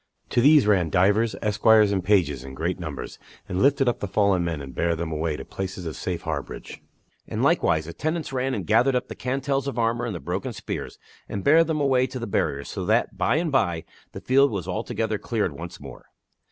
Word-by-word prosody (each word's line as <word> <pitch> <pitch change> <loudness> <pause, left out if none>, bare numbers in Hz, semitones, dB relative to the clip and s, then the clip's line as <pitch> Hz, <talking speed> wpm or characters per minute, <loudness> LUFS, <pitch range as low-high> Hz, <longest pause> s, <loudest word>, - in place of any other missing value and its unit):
To 120 - +3
these 145 0 +6
ran 95 -6 +3
divers 105 +7 +2
esquires 105 0 +4
and 95 -3 0
pages 85 -10 +2
in 65 0 -9
great 85 +6 -2
numbers, 80 -6 -6 0.3
and 90 - -2
lifted 135 -1 +3
up 120 - +1
the 100 - -3
fallen 100 -2 +2
men 85 -3 -2
and 70 -2 -8
bare 85 0 0
them 80 0 -4
away 80 0 -2
to - - -8
places 95 -2 -5
of 80 -3 -4
safe - - -4
harborage. - - -5 0.5
And - - -2
likewise 80 -1 +2
attendants 155 - -3
ran 130 0 -1
and 95 - -4
gathered 120 +6 +3
up 125 - -1
the - - -6
cantels 135 +1 -1
of 135 - -4
armor 115 +1 0
and 110 - -4
the - - -5
broken 95 +10 -4
spears, - - -6 0.3
and 100 -2 -4
bare 160 +3 +6
them 160 -1 -2
away 130 -3 +2
to 130 - -7
the 120 - -4
barriers, 70 -8 -1
so - - -5
that, - - +1
by - - +1
and 160 0 0
by, 90 -12 +1 0.3
the - - -7
field 135 +2 +4
was 95 -6 -4
altogether 110 +2 -2
cleared 110 -7 -1
once 85 +5 -8
more. 70 -3 -11
105 Hz, 215 wpm, -24 LUFS, 85-130 Hz, 0.5 s, these